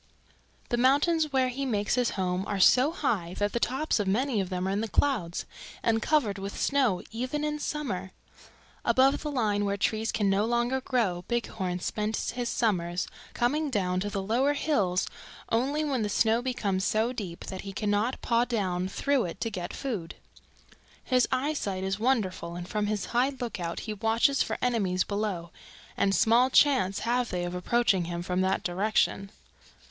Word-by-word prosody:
"The 240 - +1
mountains 290 +5 +3
where 260 -1 +2
he 265 +3 -4
makes 210 -6 0
his 245 -1 +2
home 185 0 0
are 200 -1 -2
so 255 +9 +6
high 200 - -1
that 205 0 0
the 235 - 0
tops 265 +2 0
of 205 - -1
many 230 +2 +1
of 185 - -4
them 185 0 -2
are - - 0
in 200 +2 0
the 225 - -2
clouds 215 -10 0 0.4
and 225 -1 +2
covered 225 -11 +1
with 195 +1 -5
snow 260 -10 +2
even 255 +6 -3
in 300 0 -1
summer. 250 -12 -3 0.7
Above 270 +1 +3
the 300 - -3
line 215 -7 0
where 200 0 0
trees 220 +3 0
can 210 -2 0
no 195 +1 +2
longer 240 +3 0
grow 210 -10 0
Bighorn 195 -7 -2
spends 215 +3 -2
his 240 0 -3
summers, 180 -6 0 0.3
coming 290 +5 +1
down 185 -6 0
to 205 +2 -2
the 195 -1 -3
lower 250 +8 +2
hills 205 - +1 0.4
only 275 +7 +1
when 275 -5 0
the 210 - -1
snow 225 +3 +2
becomes 205 -7 -1
so 220 +5 +1
deep 185 -8 -6
that 190 - -6
he 195 - -7
cannot 210 +4 -1
paw 235 0 +3
down 190 -7 -1
through 275 +5 +1
it 175 +2 -6
to 225 - -1
get 180 -3 -4
food. 210 -12 -4 0.9
His 255 -1 +2
eyesight 255 -9 -1
is 195 +1 -2
wonderful 195 -8 0
and 175 0 -6
from 210 +1 -1
his 210 -2 -1
high 245 +3 +3
lookout 180 -8 -4
he 215 - -4
watches 225 +7 +2
for - - -1
enemies 200 -7 +1
below, 200 -5 -3 0.4
and 195 0 +2
small 240 +3 +4
chance 255 -9 +3
have 240 +1 0
they 180 -1 -2
of 175 0 -3
approaching 190 0 +1
him 170 0 -4
from 180 +1 -1
that 190 0 +1
direction. 195 +2 0
220 Hz, 180 wpm, -28 LUFS, 190-255 Hz, 0.9 s, so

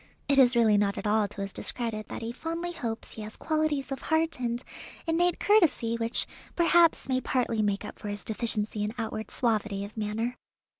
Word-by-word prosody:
It 280 -1 +4
is 250 -1 +6
really 220 -3 +5
not 200 -1 +1
at - - -5
all 210 0 +3
to 200 0 -8
his 195 0 -4
discredit 225 -3 -3
that - - -6
he 230 - -3
fondly 330 +6 -4
hopes 235 -9 -5
he 220 - -8
has 215 +1 -8
qualities 310 -3 0
of 270 - -3
heart 320 -2 +1
and 240 0 0 0.4
innate 345 +1 +2
courtesy 335 - +3
which 230 0 0 0.3
perhaps 340 -1 +4
may 260 -1 +1
partly 240 -4 0
make 205 -1 0
up - - -9
for 210 - -7
his 205 0 -4
deficiency 215 -1 -1
in 210 +2 -3
outward 220 -1 -4
suavity 215 -4 +1
of 205 - -12
manner. 225 +3 -2
230 Hz, 195 wpm, -28 LUFS, 215-290 Hz, 0.4 s, is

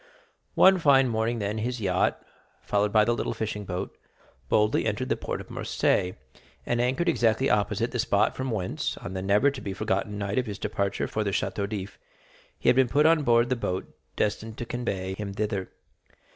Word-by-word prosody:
One 190 0 +6
fine 135 -4 +5
morning, 115 +1 0
then, 105 0 -2
his 120 +2 -2
yacht, 95 -3 +1 0.4
followed 105 0 +1
by 105 0 +5
the 120 - +2
little - - -2
fishing 105 -2 -4
boat, 90 -1 -4 0.5
boldly 105 +1 +2
entered 115 +5 -2
the - - +2
port - - -4
of - - -10
Marseilles, 90 0 0 0.5
and 120 0 0
anchored 130 +8 0
exactly 120 -4 +2
opposite 105 +2 +1
the 125 - -3
spot 105 -3 +2
from 130 0 -3
whence, 95 -6 -2
on 90 - -7
the 95 - -3
never 105 +9 +3
to 135 - -8
be 100 - -4
forgotten 105 0 -2
night 100 +2 -1
of 125 - -2
his 105 -1 -5
departure 100 -2 -2
for 110 - -2
the 100 - -1
Château 100 +1 -2
d'If, 100 -2 -6 0.6
he - - -5
had - - +6
been 130 -2 +4
put 150 +4 +3
on 160 -1 +5
board 120 -3 +3
the 130 - +2
boat 95 -6 -4 0.2
destined 110 +1 -2
to 120 - -4
convey 100 -6 -3
him 100 0 -6
thither. 100 -3 -2
110 Hz, 195 wpm, -27 LUFS, 100-120 Hz, 0.6 s, One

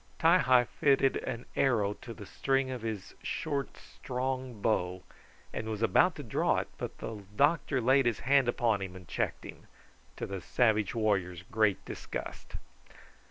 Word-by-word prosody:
Ti 170 +3 +6
hi 130 -4 +5
fitted 135 +2 +2
an 120 -1 -5
arrow 110 -7 +2
to 115 - -11
the 105 -2 -9
string 135 +4 0
of 125 -2 -5
his 110 -4 -5
short, 140 -2 -3
strong 130 -2 -4
bow, 90 -4 0 0.5
and 110 0 -4
was 110 0 -3
about 175 +9 +4
to 145 - -7
draw 115 - +1
it, - - -1
but - - -5
the 105 -3 -6
doctor 140 +1 +2
laid 130 +2 +4
his 115 - 0
hand 135 -1 +4
upon 115 -4 +1
him 95 -1 -5
and 90 -2 -11
checked - - -2
him, - - -11 0.5
to - - -4
the 95 -1 -5
savage 110 0 +2
warrior's 95 -6 0
great 110 0 +1
disgust. - - -7
115 Hz, 160 wpm, -31 LUFS, 105-130 Hz, 0.5 s, Ti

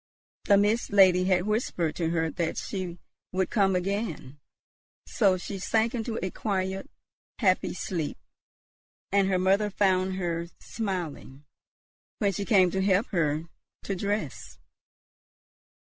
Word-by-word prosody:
The 200 - +5
Mist 210 +4 +1
Lady 185 -2 +6
had 185 -1 +2
whispered 210 -7 -1
to 165 -2 0
her 165 -1 0
that 170 -3 -2
she 185 -3 -4 0.3
would 185 0 -1
come 195 -4 +3
again; 180 - -3 0.7
so 195 -5 +2
she 195 +2 -6
sank 225 +4 +1
into 230 -1 -3
a 185 - -3
quiet, 190 -2 -2 0.5
happy 185 -5 +1
sleep, 165 -5 -3 0.9
and 200 -1 +3
her 190 -1 +2
mother 195 +3 +2
found 190 -1 +1
her 170 -2 -2
smiling, 170 - -5 0.7
when 200 -2 +1
she 200 +2 -3
came 190 -5 +4
to 190 - 0
help 195 +4 +2
her 155 -4 0 0.4
to 195 - -2
dress. 205 +3 -3
190 Hz, 130 wpm, -27 LUFS, 175-205 Hz, 0.9 s, Lady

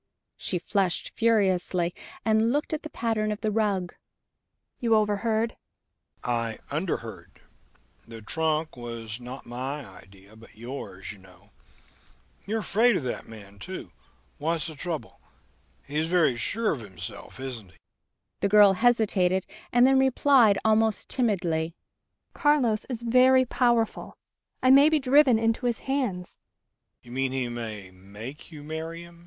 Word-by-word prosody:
She 180 - -2
flushed 185 0 -1
furiously, 185 -6 +1 0.3
and 220 +1 +3
looked 295 +3 -1
at 310 - -2
the 310 - -8
pattern 225 -5 -1
of 210 - -4
the 215 -1 0
rug. 200 -5 0 0.9
"You 230 -2 +3
overheard?" 220 +2 +1 0.7
"I 115 -2 -1
underheard. 145 - -4 0.6
The 115 -1 -10
trunk 160 +5 0
was 115 -2 -7
not 125 +2 -9
my 130 +4 -5
idea 95 +1 -16
but 110 -1 -17
yours, 120 -5 -7
you 105 - -12
know.... 90 -1 -20 1.0
You're 220 +2 -1
afraid 230 +3 +3
of - - -4
that 125 - -4
man, 100 -3 -12
too. - - -7 0.5
What's 160 +2 -1
the 160 - -6
trouble? 160 +1 -6 0.6
He's 150 +3 -1
very 165 -7 +3
sure 220 - 0
of 150 - -3
himself, 100 +3 -9
isn't 125 -7 -6
he?" 80 - -22 0.6
The 200 - +1
girl 205 -1 +7
hesitated, 195 -5 +2 0.3
and 245 +1 +5
then 265 0 +5
replied 265 -5 +4
almost 220 0 +2
timidly: 170 -9 0 0.6
"Carlos 255 -8 +2
is 240 -2 -4
very 255 +2 +5
powerful.... 235 -2 0 0.5
I 255 - +6
may 280 +3 +8
be 315 - +3
driven 270 -2 +5
into 225 +2 0
his 235 - 0
hands." 245 -10 -2
195 Hz, 125 wpm, -26 LUFS, -, 1.0 s, may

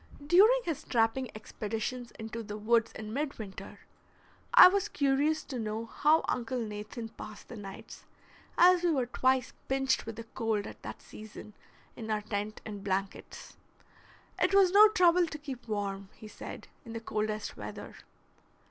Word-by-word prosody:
During 420 +10 +6
his 330 - -3
trapping 235 +2 +1
expeditions 225 +3 -4
into 220 +1 -6
the 210 -1 -6
woods 230 +1 +2
in 215 0 -7
midwinter, 255 -8 -5 0.7
I - - +11
was 390 +1 +1
curious 290 +3 +1
to 260 -4 -6
know 220 +1 -3
how 300 +7 +2
Uncle 250 +1 -2
Nathan 215 +1 -6
passed 215 -1 -11
the 245 - -8
nights, 195 -2 -10 0.5
as 360 0 +6
we 350 - +2
were 270 -6 +1
twice 260 +1 +1
pinched 270 -3 0
with 225 - -5
the 230 - -7
cold 225 -2 -2
at - - -10
that - - -8
season 215 0 -11 0.4
in 225 -2 -7
our 215 -1 0
tent 210 0 -4
and 205 -2 -7
blankets. 195 0 -4 0.8
It - - +3
was 385 -2 +6
no 420 +2 +9
trouble 360 -4 +4
to 310 - -6
keep 270 -5 -8
warm, 200 -2 -3
he 215 - -11
said, - - -9 0.2
in 230 -4 -9
the 230 - -4
coldest 215 -1 -3
weather. - - -8
230 Hz, 155 wpm, -30 LUFS, 215-290 Hz, 0.8 s, I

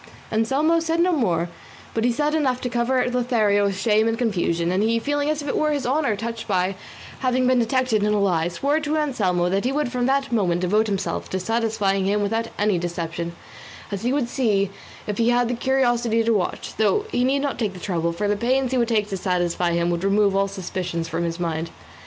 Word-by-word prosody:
Anselmo 275 +9 +2
said 330 0 -1
no 360 +2 +3
more, 175 - +1 0.5
but 225 - -1
he 245 - +3
had 235 - -2
said 300 0 +1
enough 265 -5 +1
to 250 - -2
cover 250 +1 +1
Lothario 235 -5 +2
with 195 -1 -1
shame 215 +1 +3
and 225 0 0
confusion, 175 -7 0
and 185 +2 +1
he, 225 +2 +2
feeling 290 +4 -1
as 305 -1 -1
it 285 - -2
were 305 0 +1
his 285 -3 -1
honour 270 -3 +1
touched 230 +2 -5
by 185 -1 +1 0.5
having 255 -1 +1
been 255 0 +3
detected 240 -2 +1
in 210 +1 +1
a 210 - +2
lie, 175 -5 +2
swore 280 - 0
to 305 0 -1
Anselmo 195 - +1
that 195 +2 0
he 255 - 0
would 285 -3 -1
from 250 -1 0
that 275 0 +1
moment 180 -6 +1
devote 210 +5 +2
himself 195 -2 -2
to 190 - -2
satisfying 210 -2 0
him 205 +1 +1
without 225 +3 -1
any 205 -3 +1
deception, 170 0 -4 0.6
as 200 -1 -3
he 245 - 0
would 275 -3 0
see 210 -6 +1 0.3
if 210 0 -4
he 230 +1 +3
had 245 0 +3
the 245 - -1
curiosity 240 -3 +1
to 230 0 +2
watch; 195 -4 -2
though 405 - +2
he 245 - +1
need 265 +2 +2
not 285 - -2
take 215 -5 -1
the 180 - -10
trouble, 170 -3 -1
for 185 +5 -2
the 205 - +2
pains 255 +4 +1
he 260 - +1
would 235 - +2
take 215 -3 +1
to 195 - -3
satisfy 175 -2 0
him 170 0 +1
would 170 +1 -2
remove 200 0 +3
all 195 0 +2
suspicions 180 -3 -4
from 165 +1 -2
his 170 0 -3
mind. 165 -1 -2
220 Hz, 225 wpm, -23 LUFS, 190-255 Hz, 0.6 s, no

